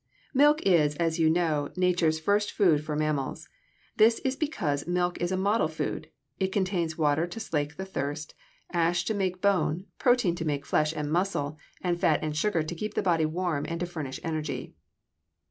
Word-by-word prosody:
= - - -32
Milk 295 +3 +5
is, 155 -6 +4
as 165 +1 0
you 160 -1 +4
know, 160 -3 +1
nature's 175 -3 +2
first 205 +5 +1
food 160 -7 +3
for 150 -1 -3
mammals. 150 -3 -2 0.5
This 225 +2 +5
is 265 0 +1
because 175 - -2
milk 175 0 0
is 175 +1 0
a 185 - 0
model 200 -1 +2
food 155 0 -4 0.3
it 190 -1 0
contains 180 -5 -1
water 155 +1 +2
to 175 +6 -7
slake 150 -8 -2
thirst, 155 -5 -4 0.4
ash 175 +1 +2
to 220 - 0
make 185 -3 -1
bone, 185 -3 +1
protein 245 -8 +3
to 165 - -3
make 145 -3 -2
flesh 155 0 +2
and 150 -2 -4
muscle, 160 -5 0 0.3
and 175 -1 0
fat 155 -3 +2
and 155 -1 -2
sugar 165 0 +1
to 155 - -5
keep 210 +6 -5
the - - 0
body 165 -4 +2
warm 165 -3 -1
and 170 0 -3
to - - +1
furnish 155 -6 -5
energy. 155 -2 -3
170 Hz, 185 wpm, -28 LUFS, 155-190 Hz, 0.5 s, Milk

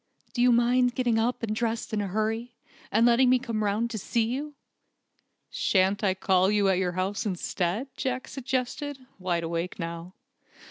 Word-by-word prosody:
Do 240 - 0
you 250 0 +6
mind 245 +1 +3
getting 240 -3 +1
up 240 +2 0
and 215 -1 -1
dressing 225 -1 -1
in 205 - -1
a - - -5
hurry, 225 +4 -2 0.4
and 225 +3 +4
letting 240 +2 +5
me 255 - +6
come 230 -4 -3
round 215 +3 0
to 220 - -3
see 230 +4 0
you?" 280 +6 -3 1.0
"Shan't 195 +1 +2
I 190 -2 +2
call 190 -1 +3
at 205 - +2 0.3
your 180 -1 0
house 185 +3 -1
instead?" 190 +3 -2
Jack 255 0 -2
suggested, 265 +2 -3 0.2
wide 175 -2 -1
awake 170 +2 -3
now. 170 +1 -6
225 Hz, 170 wpm, -27 LUFS, 190-245 Hz, 1.0 s, you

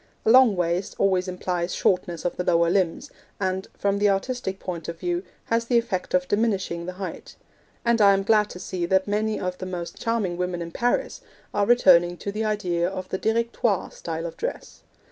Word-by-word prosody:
A 220 - +5
long 250 -4 +7
waist 175 +1 -1
always 190 -1 +2
implies 180 -1 -2
shortness 175 -3 0
of 175 - -1
the 180 - -2
lower 170 -1 +3
limbs, 190 - 0 0.3
and, 190 -1 -1
from 200 0 0
the 205 0 +4
artistic 195 0 -1
point 170 -3 -5
of 170 0 -6
view, 175 -1 -1 0.2
has 230 0 0
the 240 0 +2
effect 195 -7 -1
of 180 0 +1
diminishing 190 -6 0
the 185 - -4
height; 190 +1 -7 0.5
and 235 -1 +3
I 200 -1 +7
am 195 0 +1
glad 210 0 +3
to 180 - -9
see 180 -1 -3
that 190 +2 +2
many 215 +1 0
of 180 0 -3
the 185 - -5
most 175 -2 -6
charming 220 -7 -1
women 180 -1 -2
in 170 - -8
Paris 245 +7 -1 0.3
are 205 -1 +1
returning 175 -7 +5
to 200 - -4
the 215 +2 -2
idea 180 -5 0
of 185 -1 -6
the 190 - -2
Directoire 230 -2 0
style 165 0 -5
of 170 - -6
dress. 485 +3 -5
190 Hz, 200 wpm, -25 LUFS, 175-215 Hz, 0.5 s, long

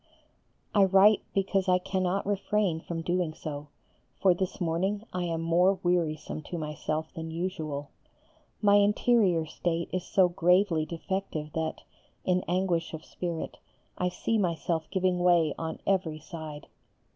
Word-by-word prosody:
I 205 - +6
write 195 +2 +6
because 195 -1 +1
I 180 - +5
cannot 185 +1 -1
refrain 200 -3 0
from 165 0 -5
doing 175 -2 0
so; 145 -1 -6 0.5
for 190 -2 +5
this 185 +2 -3
morning 185 +4 0
I 180 -1 -1
am 165 -1 -2
more 175 +4 +3
wearisome 165 -4 0
to 175 - -3
myself 155 0 -3
than 160 0 -6
usual. 160 -4 -4 0.7
My 205 0 +6
interior 205 -4 +3
state 165 +1 -2
is 185 -1 -1
so 185 0 +4
gravely 175 -2 +2
defective 165 -3 -4
that, 160 -1 -3 0.4
in 180 0 +2
anguish 175 -2 0
of 160 - -10
spirit, 170 -2 -5 0.4
I 180 - 0
see 225 +4 -1
myself 165 -3 -1
giving 185 -1 +1
way 175 -4 +4
on 160 0 -3
every 180 -5 +1
side. 155 -1 -8
175 Hz, 140 wpm, -28 LUFS, 160-190 Hz, 0.7 s, I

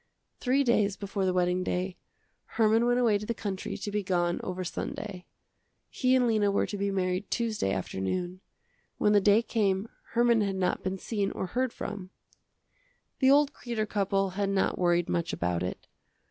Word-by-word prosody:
Three 270 +2 +2
days 210 -5 +2
before 200 -1 -2
the 185 - +2
wedding 180 0 +1
day, 180 +1 -2 0.6
Herman 225 +1 +4
went 245 0 +3
away 220 -4 +3
to 210 - -6
the 235 - -1
country 195 -3 -4
to 205 - -5
be 210 0 0
gone 175 -2 0
over 185 0 -3
Sunday. 185 +1 -5 0.6
He 255 -1 +2
and 255 -1 +4
Lena 215 -3 +2
were 200 - +1
to - - -5
be 200 0 -1
married 185 0 -1
Tuesday 220 - -1
afternoon. 175 - -3 0.6
When 210 - +3
the 205 - +5
day 205 +3 +5
came 200 -2 0 0.3
Herman 235 -1 +4
had 200 -2 0
not 185 -1 0
been 185 +1 -2
seen 200 0 -2
or - - -3
heard 250 +7 -1
from. 200 -5 -6 1.1
The 265 - +5
old 285 +1 +5
Kreder 230 -3 -3
couple 195 -2 0
had 200 +1 -1
not 195 -1 0
worried 175 -1 +2
much 170 -1 -1
about 85 0 -1
it. 90 +1 -4
200 Hz, 175 wpm, -29 LUFS, 185-225 Hz, 1.1 s, the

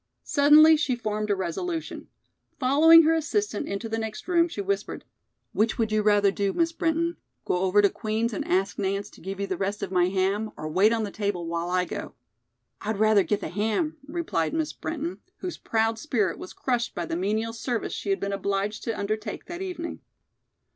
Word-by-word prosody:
Suddenly 305 +2 +6
she 275 -4 0
formed 215 -2 -3
a 205 - +3
resolution. 320 - -4 0.5
Following 315 +5 +7
her 320 +1 +4
assistant 325 +1 -1
into 200 +3 -3
the 225 0 -2
next 220 +4 -5
room, 340 -2 +3
she 320 - -8
whispered: 200 0 -3 0.5
"Which 220 +2 +1
would 225 -3 0
you 215 0 +2
rather 205 -1 +4
do, 200 -1 -1
Miss 335 0 +1
Brinton? 335 +1 0 0.3
Go - - +1
over 190 +3 +3
to 200 - +6
Queen's 225 +1 -2
and - - -2
ask 190 +2 0
Nance 200 0 -2
to - - -16
give 195 +2 -6
you 200 - 0
the 185 -2 -3
rest 200 +2 -2
of 185 - -4
my 180 -2 +3
ham 195 +3 0
or 155 - -5
wait 190 +8 +4
on 230 -1 0
the 205 - -4
table 200 -5 -2
while 170 +1 -2
I 180 0 +1
go?" - - -6 0.7
"I'd 215 0 -2
rather 215 -1 +5
get 200 +3 -1
the - - -4
ham," 220 - -1
replied 295 - -1
Miss 315 -1 -1
Brinton, 325 +2 -4 0.2
whose 360 - -6
proud 225 0 0
spirit 220 - 0
was 185 - -8
crushed 240 -2 -2
by 175 - -2
the 165 - -3
menial 215 +5 -1
service 235 0 -3
she 200 - -4
had 195 - +1
been 200 0 -2
obliged 200 +2 -2
to 230 - -2
undertake 215 +2 -3
that 345 +1 -7
evening. 355 -3 -5
215 Hz, 200 wpm, -26 LUFS, 195-290 Hz, 0.7 s, Following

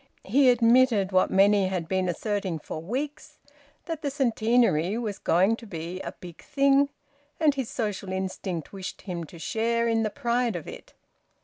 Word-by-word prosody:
He 260 +6 +4
admitted, 235 -4 +4
what 185 0 +3
many 195 0 +4
had 180 -3 -3
been 185 0 0
asserting 195 -1 -2
for 155 +1 -7
weeks, 290 - -5 0.5
that 330 -2 -4
the 290 - -1
Centenary 230 - +2
was 215 -4 -4
going 190 +6 +3
to 230 - -12
be 170 0 -6
a - - -6
big 175 -2 -12
thing; 280 -1 +3 0.5
and 310 -2 +4
his 265 -4 -3
social 205 -5 -3
instinct 190 -3 -4
wished 190 -2 -7
him 175 -4 -5
to 170 - -13
share 230 +6 0
in 225 -1 +2
the 215 - 0
pride 235 0 -1
of 170 - -6
it. - - -11
215 Hz, 170 wpm, -26 LUFS, 185-245 Hz, 0.5 s, He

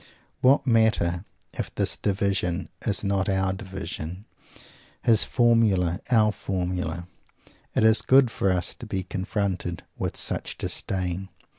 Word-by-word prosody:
What 135 +3 +4
matter 110 -7 +2 0.3
if - - -4
his - - +2
"division" 95 -4 -1 0.2
is 100 -2 +3
not 100 -1 0
our 95 -1 +1
"division," 95 -1 -7 0.8
his 115 -3 +5
"formula" 110 -8 +2
our 110 -4 +4
"formula"? 90 -4 -3 0.7
It - - +2
is 110 0 +6
good 130 -2 +5
for 100 -3 +1
us 90 -1 0
to 120 - -10
be 95 -3 -2
confronted 95 -2 -3 0.2
with - - -3
such - - -2
Disdain. 95 0 -2
95 Hz, 125 wpm, -25 LUFS, 90-110 Hz, 0.8 s, is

